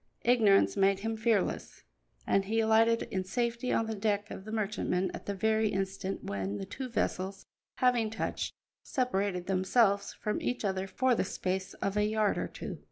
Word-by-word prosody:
Ignorance 220 -5 +4
made 195 0 +3
him 225 +1 -2
fearless, 220 -3 0 0.4
and 195 0 +2
he 225 +3 0
alighted 225 +1 +4
in 190 -1 -1
safety 235 +5 -1
on 225 - +2
the 220 - -3
deck 205 -1 -1
of 190 - -7
the 215 - -7
merchantman 205 -3 -1
at - - -8
the 200 - -2
very 220 +2 +2
instant 195 0 -3
when 100 0 -3
the 100 - -5
two 260 - -6
vessels, 195 -4 -2 0.3
having 245 -3 +2
touched, 225 - -3 0.3
separated 200 - -1
themselves 200 +2 +2
from 210 -1 -3
each 245 -3 -2
other 190 -1 -1
for 255 +6 +2
the - - +1
space 185 0 -3
of 200 +1 -2
a 210 - +3
yard 215 -1 +1
or - - -2
two. - - -7
205 Hz, 175 wpm, -31 LUFS, 190-225 Hz, 0.4 s, Ignorance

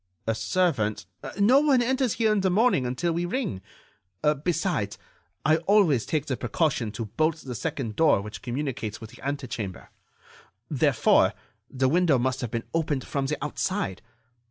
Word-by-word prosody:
"A 115 - +1
servant——" 110 - 0 0.3
"No 240 +7 +6
one 285 -3 +4
enters 260 -1 +1
here 220 -2 +2
in 210 - +2
the 190 - +2
morning 190 - +3
until 140 +8 -1
we 170 +1 -1
ring. 205 - -2 0.8
Besides, 165 - -1 0.5
I 155 +2 +5
always 170 - +3
take 155 -3 0
the 130 - -1
precaution 125 -3 0
to 115 - -4
bolt 155 +9 0
the 130 - -5
second 125 -5 -3
door 160 -10 +5
which 100 -1 -7
communicates 125 -4 -3
with 110 -1 -10
the - - -15
ante 140 0 -2
chamber. 105 -6 -6 0.8
Therefore, 145 -4 +3 0.3
the 130 0 +1
window 165 -1 +3
must 130 +2 -1
have 120 - -3
been 115 0 -3
opened 155 -5 0
from 140 -1 -2
the 150 - -1
outside. 150 - -2
145 Hz, 160 wpm, -26 LUFS, 120-175 Hz, 0.8 s, No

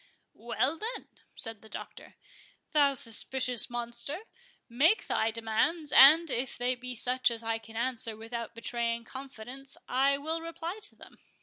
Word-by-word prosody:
"Well, 265 +7 -1
then," 460 +3 -5 0.3
said 225 -3 -5
the 220 - -15
Doctor, - - -10 0.6
"thou 285 -3 +4
suspicious 250 +1 +2
monster, 240 +7 -4 0.5
make 295 - +3
thy 220 - +1
demands, 230 +8 0
and, 310 +3 +8
if 250 +2 -1
they 245 +1 +1
be 250 0 -6
such 250 +2 +2
as 230 -1 -4
I 225 0 -1
can 225 0 -14
answer 230 -2 -1
without 230 0 -6
betraying 235 0 -2
confidence, 265 +1 -9
I 275 +2 +3
will 320 +3 -3
reply 335 +4 -6
to - - -8
them." - - -15
250 Hz, 145 wpm, -30 LUFS, 230-280 Hz, 0.6 s, and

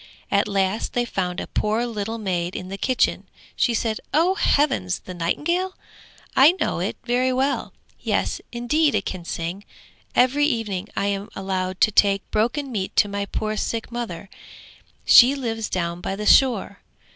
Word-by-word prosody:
At 200 +1 +2
last 195 +1 -1
they 240 0 +1
found 180 -5 -3
a - - -4
poor 220 +3 -1
little 225 -1 -4
maid 180 -4 -2
in 185 - -6
the 195 - -5
kitchen. 255 -2 0 0.3
She 235 - +1
said, 220 -1 -1 0.2
'Oh 340 +5 +4
heavens, 285 - +1
the 185 - -9
nightingale? 340 - -1 0.6
I 285 +6 +7
know 370 - -2
it 185 +4 -2
very 250 +1 +1
well. 265 +2 0 0.3
Yes, - - -1
indeed 265 +4 +1
it 200 - -1
can 180 -3 -5
sing. 170 +4 -4 0.5
Every 275 +4 +4
evening 210 -7 -2
I 200 - +1
am 200 0 -2
allowed 185 -1 -3
to 215 - +5
take 200 -1 +2
broken 250 +6 0
meat 195 -5 -3
to - - +4
my 200 0 -3
poor 215 +1 -3
sick 225 +2 -3
mother: 220 -7 -5 0.8
she 255 +3 +8
lives 225 -5 -3
down 170 -1 -2
by 195 - -3
the 210 +1 -5
shore. 225 -5 +4
215 Hz, 165 wpm, -23 LUFS, 190-250 Hz, 0.8 s, she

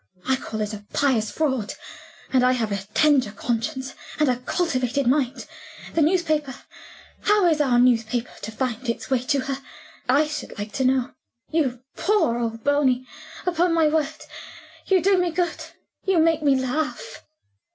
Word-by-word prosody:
I 265 - +4
call 220 -4 -5
it 210 0 -2
a 210 -1 -7
pious 245 -7 +2
fraud. 265 -9 -1 0.6
And 255 -1 +4
I 255 0 +4
have 225 -4 -1
a 200 - 0 0.2
tender 285 -7 +4
conscience, 240 +5 -3 0.2
and 300 -3 +3
a 250 - +1
cultivated 260 -2 -1
mind. 265 +1 +1 0.5
The 325 - +2
newspaper? 310 -5 +1 0.7
How 415 -2 +3
is 315 -3 +3
our 255 -4 +3
newspaper 240 -1 +2
to 220 - -5
find 245 +1 -3
its 235 - -3
way 260 - +3
to 275 +1 +1
her, 270 +1 -3 0.5
I 285 +4 +5
should 300 -5 -6
like 205 +1 -5
to 265 +5 -1
know? 260 0 +2 0.4
You 260 -6 0
poor 335 - +2
old 225 -1 -3
Bony! 270 -3 +2 0.4
Upon 345 -1 +2
my 320 -2 +4
word 305 -2 0 0.7
you 375 -3 +3
do 390 0 +4
me 355 -1 +1
good 345 0 -2 0.4
you 380 -2 +2
make 325 -1 +3
me 285 -3 +4
laugh." 265 +4 -3
265 Hz, 160 wpm, -24 LUFS, 245-315 Hz, 0.7 s, I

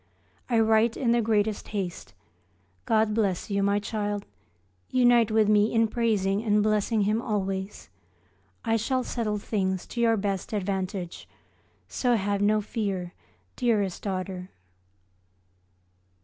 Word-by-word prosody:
I 235 -2 +3
write 225 +1 +3
in 240 -4 +1
the 235 0 +3
greatest 215 -1 0
haste. 195 -5 -5 0.7
God 220 -1 +2
bless 205 -3 -1
you, 200 0 +1
my 200 +1 +2
child. 205 -1 -3 0.6
Unite 240 -3 +4
with 220 -1 +3
me 210 0 +4
in 225 -1 +3
praising 215 -3 0
and 210 -2 +2
blessing 215 +1 +1
Him 210 +3 +1
always. 195 -3 -3 0.8
I 225 0 +2
shall 255 +4 0
settle 220 -4 -2
things 190 -3 -2
to 235 - -4
your 225 -1 +3
best 195 0 -3
advantage, 190 -3 -3 0.6
so 245 -2 +1
have 200 -1 -1
no 210 +1 +3
fear, 195 -5 -3 0.4
dearest 210 -7 0
daughter. 185 -2 -4
210 Hz, 125 wpm, -27 LUFS, 195-225 Hz, 0.8 s, Unite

